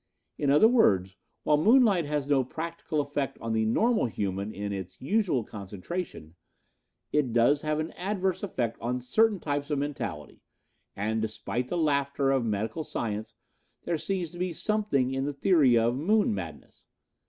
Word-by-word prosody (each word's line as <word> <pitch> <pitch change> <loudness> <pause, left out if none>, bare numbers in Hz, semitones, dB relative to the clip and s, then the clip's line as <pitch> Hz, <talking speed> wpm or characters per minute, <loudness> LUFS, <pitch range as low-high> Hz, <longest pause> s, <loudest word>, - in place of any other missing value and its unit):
In 145 - +1
other 150 +10 +7
words, 95 - +3 0.3
while 150 - +3
moonlight 210 - +4
has 145 -2 -1
no 140 -2 +3
practical 160 +2 -3
effect 145 -2 -3
on 115 0 -3
the 110 0 +1
normal 220 - +2
human 100 -1 -3
in 100 -1 -4
its 95 -2 -7
usual 180 - +1
concentration, 100 - -6 0.8
it 145 -5 +1
does 120 +5 +3
have 155 0 -1
an 155 +1 -3
adverse 190 -1 -2
effect 125 - -2
on 125 +2 -1
certain 210 - +2
types 145 -2 -2
of 145 - 0
mentality 145 0 -5 0.5
and, 110 +2 -1
despite 110 +3 -3
the 175 - -2
laughter 140 -3 +1
of 135 -2 +2
medical 110 +7 -2
science, 110 -6 -4 0.5
there 165 -2 -1
seems 180 -3 -2
to 175 - -10
be 180 -1 -1
something 160 -11 0
in 135 +1 -1
the 145 - -2
theory 140 -5 +4
of 115 +2 +2
'moon 200 - +2
madness.' 80 -7 -8
140 Hz, 160 wpm, -28 LUFS, 115-170 Hz, 0.8 s, other